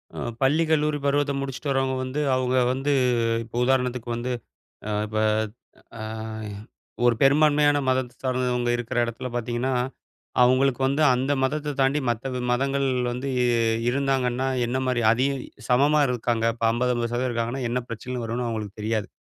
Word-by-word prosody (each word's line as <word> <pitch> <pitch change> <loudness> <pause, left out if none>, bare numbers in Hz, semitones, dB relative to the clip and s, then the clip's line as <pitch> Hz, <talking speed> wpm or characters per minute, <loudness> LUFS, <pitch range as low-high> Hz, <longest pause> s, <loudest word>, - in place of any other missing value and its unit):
அ - - -8 0.2
பள்ளி, 145 +5 +3
கல்லூரி 150 -1 +2
பருவத்த 145 0 +2
முடிச்சுட்டு 135 +1 -4
வர்றவுங்க 135 -1 +1
வந்து, 130 +3 -3 0.2
அவுங்க 130 0 +1 0.2
வந்து 135 +2 -1 0.5
இப்ப 115 +1 -13
உதாரணத்துக்கு 125 -2 0
வந்து, 120 +2 -3 0.6
அ - - -2 0.2
இப்ப 110 0 -3 0.8
அய 110 0 -6 0.6
ஒரு 120 - +5
பெரும்பான்மையான 145 +1 +4
மதத்த 130 -1 0
சார்ந்தவங்க 125 -1 0
இருக்கிற 120 -1 -5
இடத்துல 120 +2 -5
பார்த்தீங்கன்னா, 120 +2 -1 0.7
அவுங்களுக்கு 130 +1 +3
வந்து 140 +3 +1
அந்த 130 +3 0
மதத்தை 150 +2 -1
தாண்டி 135 +3 +2
மத்த 120 +3 -2
வி 125 - -2
மதங்கள் 135 +2 +1 0.2
வந்து 125 +3 -4 0.6
இருந்தாங்கன்னா 130 -1 0 0.2
என்னமாரி 130 0 0
அதிக 130 +4 +1 0.4
சமமா 145 +5 +4
இருக்காங்க. 120 -2 -1
இப்ப 115 - -4
50, 125 +2 0
50% 120 +1 -1
இருக்காங்கன்னா, 120 +3 -2
என்ன 125 +2 0
பிரச்சனைகள் 120 +1 -5
வருன்னு 120 +2 -2
அவுங்களுக்கு 110 -3 -5
தெரியாது. 110 -1 -1
125 Hz, 140 wpm, -25 LUFS, 120-135 Hz, 0.8 s, ஒரு